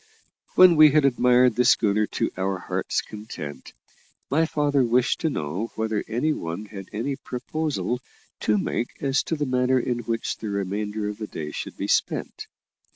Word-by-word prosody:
When 185 Hz, -2 st, +8 dB
we 155 Hz, 0 st, +9 dB
had 150 Hz, 0 st, +3 dB
admired 125 Hz, -2 st, +4 dB
the 125 Hz, -, +3 dB
schooner 105 Hz, -2 st, +3 dB
to -, -, -2 dB
our 95 Hz, 0 st, -1 dB
hearts' 90 Hz, -, -2 dB
content, 105 Hz, -9 st, -8 dB, 0.6 s
my 160 Hz, +3 st, +3 dB
father 145 Hz, -3 st, +1 dB
wished 125 Hz, +1 st, +2 dB
to 165 Hz, -, 0 dB
know 90 Hz, -, -3 dB
whether 110 Hz, -1 st, -1 dB
any 125 Hz, +8 st, 0 dB
one 85 Hz, -, -5 dB
had 95 Hz, -2 st, -9 dB
any 130 Hz, +6 st, -3 dB
proposal 130 Hz, 0 st, -3 dB, 0.4 s
to 105 Hz, -, +2 dB
make 115 Hz, +4 st, -2 dB
as 135 Hz, 0 st, +2 dB
to 165 Hz, -, -2 dB
the 150 Hz, -1 st, -1 dB
manner 130 Hz, 0 st, +2 dB
in 120 Hz, 0 st, -1 dB
which 115 Hz, -1 st, -3 dB
the 110 Hz, -, -5 dB
remainder 105 Hz, +2 st, -2 dB
of 105 Hz, +1 st, -5 dB
the 110 Hz, -, -4 dB
day 75 Hz, -5 st, -6 dB
should -, -, -6 dB
be -, -, -3 dB
spent. -, -, -1 dB
115 Hz, 170 wpm, -24 LUFS, 105-135 Hz, 0.6 s, we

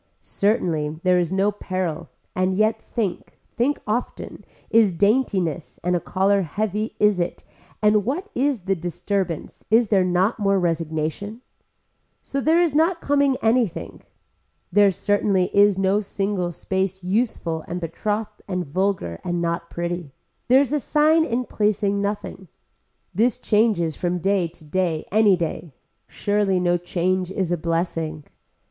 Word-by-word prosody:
Certainly 160 Hz, -8 st, 0 dB
there 180 Hz, -1 st, +4 dB
is 175 Hz, -1 st, -1 dB
no 195 Hz, +2 st, +2 dB
peril 185 Hz, -5 st, -4 dB, 0.3 s
and 185 Hz, 0 st, +1 dB
yet 215 Hz, +2 st, +1 dB
think, 205 Hz, -7 st, -4 dB, 0.2 s
think 270 Hz, +4 st, +1 dB
often, 225 Hz, +4 st, -4 dB, 0.3 s
is 220 Hz, -3 st, +5 dB
daintiness 190 Hz, -, 0 dB
and 180 Hz, +1 st, +1 dB
a -, -, +1 dB
collar 195 Hz, +3 st, +1 dB
heavy 210 Hz, +5 st, -2 dB
is 210 Hz, -3 st, +3 dB
it 175 Hz, 0 st, -3 dB, 0.4 s
and 210 Hz, 0 st, +4 dB
what 305 Hz, -, -2 dB
is 270 Hz, -3 st, 0 dB
the 195 Hz, +2 st, 0 dB
disturbance, 175 Hz, 0 st, -3 dB
is 225 Hz, 0 st, +4 dB
there 195 Hz, -3 st, +4 dB
not 185 Hz, +5 st, +1 dB
more 195 Hz, -1 st, +2 dB
registration. 165 Hz, +5 st, -2 dB, 0.8 s
So 275 Hz, -, -3 dB
there 325 Hz, +5 st, +4 dB
is 330 Hz, -5 st, 0 dB
not 330 Hz, +3 st, +2 dB
coming 280 Hz, -3 st, +2 dB
anything. 225 Hz, -5 st, 0 dB, 0.7 s
There 205 Hz, +2 st, +5 dB
certainly 195 Hz, 0 st, +1 dB
is 200 Hz, -1 st, +5 dB
no 195 Hz, +1 st, +2 dB
single 195 Hz, -3 st, -2 dB
space 190 Hz, +2 st, -2 dB
useful 180 Hz, -5 st, -1 dB
and 175 Hz, -, -4 dB
betrothed 210 Hz, +5 st, -3 dB
and 180 Hz, -2 st, -2 dB
vulgar 170 Hz, -, -2 dB
and 175 Hz, -1 st, -2 dB
not 170 Hz, 0 st, -2 dB
pretty. 170 Hz, -4 st, -4 dB, 0.3 s
There 260 Hz, +2 st, +6 dB
is 280 Hz, 0 st, -1 dB
a 300 Hz, -, +2 dB
sign 310 Hz, +3 st, +3 dB
in 250 Hz, -3 st, -1 dB
placing 205 Hz, -2 st, 0 dB
nothing. 200 Hz, -2 st, -4 dB, 0.7 s
This 235 Hz, +6 st, +2 dB
changes 210 Hz, -9 st, +1 dB
from 180 Hz, 0 st, -1 dB
day 190 Hz, 0 st, +1 dB
to 165 Hz, -1 st, -16 dB
day 165 Hz, 0 st, -1 dB
any 205 Hz, -2 st, +4 dB
day. 165 Hz, -3 st, -4 dB, 0.3 s
Surely 205 Hz, -2 st, 0 dB
no 175 Hz, 0 st, +2 dB
change 180 Hz, +1 st, -1 dB
is 190 Hz, -2 st, -2 dB
a -, -, +3 dB
blessing. 165 Hz, -2 st, -2 dB
195 Hz, 145 wpm, -23 LUFS, 175-215 Hz, 0.8 s, There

